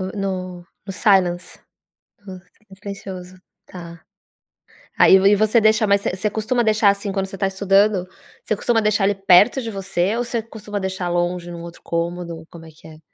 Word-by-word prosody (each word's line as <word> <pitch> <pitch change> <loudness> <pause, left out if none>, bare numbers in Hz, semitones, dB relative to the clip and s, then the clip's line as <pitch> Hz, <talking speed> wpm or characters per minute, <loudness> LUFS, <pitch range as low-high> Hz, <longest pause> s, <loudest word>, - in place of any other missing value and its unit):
No 185 -3 -5 0.2
no 195 - -6
silence 185 -3 +1 0.7
no 190 -1 -8
s 180 - -15 0.4
silencioso 185 -2 -9 0.3
tá. 170 -2 -11 1.0
Aí, - - +6
e - - +6
v 200 +2 +4
você 215 +2 +3
deixa, 215 0 +3
mas 200 0 +3
você 185 - -2
você 210 +3 -1
costuma 220 +4 -1
deixar, 215 -1 +3
assim, 200 0 -1
quando 195 0 -2
você 195 0 -9
está 195 - -1
estudando? 195 0 +2 0.4
Você 215 - -1
costuma 225 +2 +1
deixar 210 -2 +1
ele 200 +1 +1
perto 195 +6 +4
de 230 -2 -5
você 195 0 -1
ou 245 - -1
você 235 -1 -3
costuma 210 -2 -7
deixar 190 -1 -4
longe 175 0 -2
num 170 -1 -8
outro 170 0 -11
cômodo? 170 -1 -4
Como 165 -1 -12
é - - -12
que 155 +1 -17
é? 155 -1 -14
195 Hz, 185 wpm, -20 LUFS, 180-210 Hz, 1.0 s, Aí